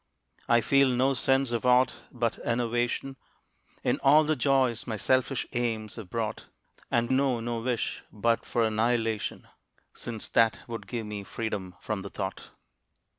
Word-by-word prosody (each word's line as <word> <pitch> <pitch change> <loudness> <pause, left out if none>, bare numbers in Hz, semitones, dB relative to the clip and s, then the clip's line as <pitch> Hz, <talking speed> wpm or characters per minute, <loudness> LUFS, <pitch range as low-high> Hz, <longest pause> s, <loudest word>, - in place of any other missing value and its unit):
I 120 0 +5
feel 140 +4 +4
no 130 +2 +2
sense 135 0 +2
of 120 -2 -1
aught 125 0 +4 0.2
but 120 -2 -1
enervation 120 +3 -1 0.7
In - - +1
all 150 +3 +6
the 155 +1 +1
joys 130 -3 +1
my 110 -3 -2
selfish 130 +1 +1
aims 110 -3 -1
have 105 -5 -8
brought, 115 0 -3 0.4
And 120 +1 +1
know 130 -2 +2
no 115 0 -2
wish 120 -1 -2
but 115 +2 +1
for 120 - 0
annihilation, 110 0 0 0.5
Since 115 -3 -6
that 110 -3 +3
would 115 -1 -6
give 115 -3 -4
me 105 -1 -5
freedom 100 -3 -4
from 105 0 -3
the 100 - -7
thought. 95 -1 -5
120 Hz, 150 wpm, -28 LUFS, 110-125 Hz, 0.7 s, all